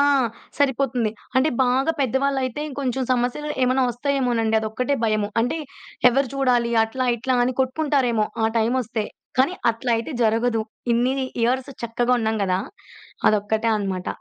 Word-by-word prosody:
ఆ! - - +6 0.6
సరిపోతుంది. 265 -5 +1 0.3
అంటే 270 +4 +4 0.2
బాగా 265 +5 +2
పెద్దవాళ్ళైతే 265 +1 0
ఇంకొంచెం 265 -2 -2
సమస్యలు 250 +5 -1
ఏమన్నా 255 +1 +3
వస్తాయేమోనండి 245 -4 0
అదొక్కటే 220 +6 -1
భయము. 215 -2 +1
అంటే 245 +8 0 0.5
ఎవరు 270 +1 +1
చూడాలి, 245 -3 +2
అట్లా 255 +3 -3
ఇట్లా 255 +2 0
అని 255 +1 -1
కొట్టుకుంటారేమో 260 -5 +1 0.2
ఆ - - +5
టైమొస్తే. 230 -1 0 0.3
కానీ 275 +8 +3 0.2
అట్లైతే 230 +2 -1
జరగదు. 225 0 +2 0.3
ఇన్ని 245 +3 +2 0.3
ఇయర్స్ 255 +3 +1
చక్కగా 240 +2 0
ఉన్నాం 220 0 0
గదా! 185 0 0 0.7
అదొక్కటే 215 +2 +1
అనమాట. 190 -3 -3
245 Hz, 125 wpm, -23 LUFS, 225-265 Hz, 0.7 s, ఆ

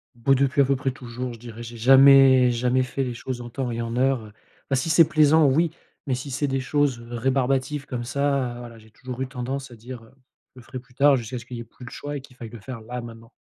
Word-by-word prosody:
Boh, 130 +4 +2
depuis 140 +1 +2
à - - +4
peu 140 +1 +1
près 135 0 -2
toujours, 125 -1 -7
je 115 - -12
dirais, 115 -1 -10
j'ai 115 0 -9
jamais 135 0 +7
jamais 125 +2 +1
fait 135 +2 -3
les 125 -2 -3
choses 125 +1 -6
en 120 - -8
temps 125 0 -4
et 115 0 -3
en 115 0 -4
heure. 125 -5 0 0.4
Bah, 135 - +2
si 130 +6 -1
c'est 160 -1 +6
plaisant, 155 0 +4
oui, 160 +4 +2 0.4
mais 130 - 0
si 130 +2 -7
c'est 145 +2 -1
des 135 0 -1
choses 135 -2 0
rébarbatives, 135 +3 -1
comme 125 -4 -5
ça, 140 -2 -1
voilà, 120 -1 -10
j'ai 110 0 -19
toujours 130 +3 -8
eu 130 - -2
tendance 135 +1 -5
à - - -11
dire, 120 +1 -10
heu: 115 - -19 0.4
«Je - - -13
le - - -12
ferai 130 - -8
plus 125 0 -22
tard», 140 -1 +5
jusqu'à 120 +2 -5
ce 115 - -9
qu'il 125 -1 -8
y - - -6
ait - - -6
plus 120 +2 -14
le - - -10
choix 145 0 -6
et - - -8
qu'il 130 -2 -17
faille 115 -2 -9
le 115 -1 -11
faire, 115 +1 -8
là 125 +3 -6
maintenant. 115 0 -12
130 Hz, 270 wpm, -24 LUFS, 120-135 Hz, 0.4 s, jamais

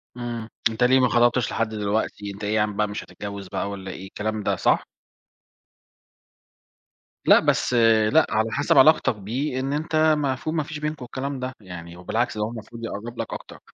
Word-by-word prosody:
إمم، 120 -2 -5 0.2
أنت 115 +2 -1
ليه 130 +2 +5
ما 130 - +4
خطَبتش 120 0 +3
لحد 115 0 0
دلوقتي؟ 105 -1 -2
أنت 100 +2 -10
إيه 105 +1 0
ياعم 105 -1 +1
بقى 105 0 +2
مش 105 - -5
هتتجوّز 100 -1 -8
بقى 100 - -3
والَّا 95 -1 -6
إيه، 95 +1 -8
الكلام 105 +2 -3
ده، - - +1
صح؟ - - +2 2.4
لأ، - - +8
بس - - +1 0.4
لأ 160 0 +6
على 110 +2 0
حسب 145 - +2
علاقتك 145 -4 +6
بيه، 125 +7 -3
إن 135 +2 -2
أنت 155 +1 -2
المفروض 155 -2 +2
ما 155 - +1
فيش 150 +1 -7
بينكم 150 -3 -4
الكلام 135 +2 -4
ده، 130 +1 -4
يعني 85 -3 -9
وبالعكس 110 +6 -1
ده 105 - 0
هو 105 - -2
المفروض 115 +1 -9
يقرّب 115 +3 -6
لك 115 - -3
أكتر. - - -9
115 Hz, 185 wpm, -24 LUFS, 105-130 Hz, 2.4 s, لأ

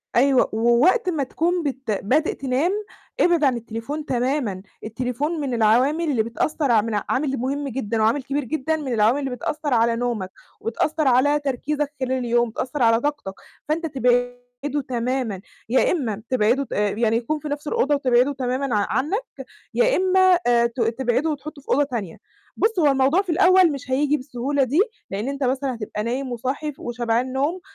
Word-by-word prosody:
أيوه، 265 +1 +4
ووقت 240 - +3
ما 315 -5 0
تكون 340 +6 -1
بت 265 -5 -3
بادئ 255 +10 +1
تنام، 275 +6 0 0.5
إبعِد 345 -3 +3
عن 260 -4 +3
التليفون 235 +7 -5
تمامًا، 245 -6 -1 0.2
التليفون 255 +8 -3
من 270 -3 -2
العوامل 245 +8 +3
اللي 230 -5 +1
بتأثر 255 +4 -1
ع 220 - +5
من 225 +1 -4 0.2
عامل 270 0 0
مُهم 275 +4 -2
جدًا، 230 -4 -2
وعامل 230 +6 +2
كبير 280 +3 -2
جدًا، 315 +5 -1
من 285 -5 -3
العوامل 225 +5 +3
اللي 270 - -3
بتأثر 290 +3 -3
على 230 0 +3
نومك، 230 -6 -2 0.3
وبتأثر 300 +6 -1
على 275 +4 +4
تركيزك 290 +2 -2
خلال 260 -1 -2
اليوم، 240 -2 +1
بتأثر 255 +4 -3
على 230 0 +4
طاقتك، 290 -9 -3 0.4
فأنت 325 +2 0
تبعده 245 +1 -1
تمامًا، 245 -4 -2 0.3
يا 260 - +3
إما 225 - -2
تبعده 255 +2 +2
ت - - -8
آآ، 210 0 +1
يعني 225 +2 +1
يكون 275 +6 -2
في 300 - -7
نَفس 290 +1 -4
الأوضة 290 0 +1
وتبعده 255 0 +2
تمامًا 260 -1 -2
ع 205 -1 +2
عنك، 355 - 0 0.5
يا - - +3
إما 375 -1 +4
آآ، 235 -1 +4
ت 235 +2 -6
تبعده 240 +5 0
وتحطُه 295 0 -6
في - - -27
أوضة 290 +2 +3
تانية، 230 -11 -5 0.4
بُص 445 -2 +1
هو 320 - +4
الموضوع 275 +6 +3
في 365 -4 -3
الأول 370 -1 +5
مش 275 -2 -7
هييجي 290 +3 +2
بالسهولة 270 +1 -2
دي، 280 +7 +1 0.3
لإن 205 +6 -3
أنت 280 0 -3
مثلًا 260 +1 0
هتبقى 210 -2 -5
نايم 250 +3 -3
وصاحي 265 +6 -3
ف 275 - -22
وشبعان 240 +1 -1
نوم، 290 +8 -1
260 Hz, 175 wpm, -22 LUFS, 235-295 Hz, 0.5 s, ع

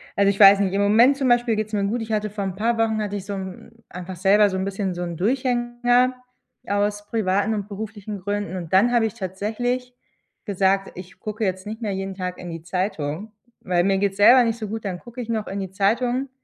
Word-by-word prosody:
also, 200 0 +3
ich 200 - -1
weiß 200 -1 +9
nicht 195 -1 0
im 200 - +1
Moment 235 +7 +5
zum 270 - 0
Beispiel 240 -2 +3
geht's 215 0 -3
mir 200 - +1
gut. 230 +4 -1
Ich 225 0 -6
hatte 215 0 0
vor 205 0 -4
'n 190 -1 -4
paar 230 +3 0
Wochen 220 -1 +1
hatte 205 -1 -3
ich 200 -1 -5
so 200 - -5
'n 190 +2 -7 0.2
einfach 180 +1 -7
selber 200 +3 +4
so 190 - -3
'n 190 - -2
bisschen 195 -1 -2
so 175 - -6
'n 170 -2 -5
Durchhänger 245 +2 +1 0.5
aus 205 0 -1
privaten 205 -1 0
und 205 -2 -3
beruflichen 210 0 -6
Gründen. 205 0 -3
Und 170 -3 -6
dann 220 +6 +5
habe 230 -2 +3
ich 215 - -2
tatsächlich 235 +5 -3 0.5
gesagt: 195 -1 +1
„Ich 180 0 -11
gucke 215 +1 -5
jetzt 185 -1 -2
nicht 220 +2 -6
mehr 210 -3 -2
jeden 195 0 -4
Tag 180 -1 -4
in 180 - -8
die 165 -1 -6
Zeitung, 180 +1 -3 0.3
weil 175 -1 +1
mir 195 +1 +2
geht's 195 0 -1
selber 245 +5 +7
nicht 230 -1 -1
so 215 -2 -5
gut, 220 0 -5
dann 180 -2 -3
gucke 240 +1 -9
ich 235 - -6
noch 220 -2 -2
in 195 - -4
die 190 -2 -5
Zeitung“ 240 +7 0
205 Hz, 235 wpm, -23 LUFS, 190-225 Hz, 0.5 s, weiß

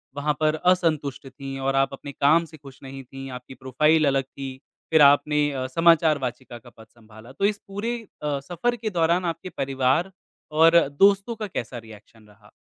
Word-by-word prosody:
वहाँ 145 +1 0
पर 155 0 +2 0.2
असंतुष्ट 155 -7 -1
थी 135 +1 -8
और 135 0 -1
आप 135 0 +1
अपने 140 +1 -8
काम 155 +5 +3
से 160 -1 -14
खुश 135 -2 -15
नहीं 135 0 -9
थी, 135 +1 -10
आपकी 125 +1 -9
प्रोफाइल 150 +5 +2
अलग 135 -1 +1
थी, 135 0 -9 0.3
फिर 160 - +5
आपने 145 -2 +3
समाचार 165 -2 +4
वाचिका 125 -1 -6
का 115 - -16
पद 110 - -14
सँभाला 110 +1 -16
तो 165 +9 -2
इस 205 0 0
पूरे 220 +5 -3 0.3
अ, 145 -2 -1
सफ़र 175 - -2
के 230 -2 -4
दौरान 170 -1 +1
आपके 170 +2 -4
परिवार 135 +6 0 0.4
और 165 +2 +6
दोस्तों 195 +8 +2
का 215 -1 -5
कैसा 120 - -6
रिएक्शन 110 -1 -15
रहा? 105 0 -21
140 Hz, 180 wpm, -24 LUFS, 130-165 Hz, 0.4 s, और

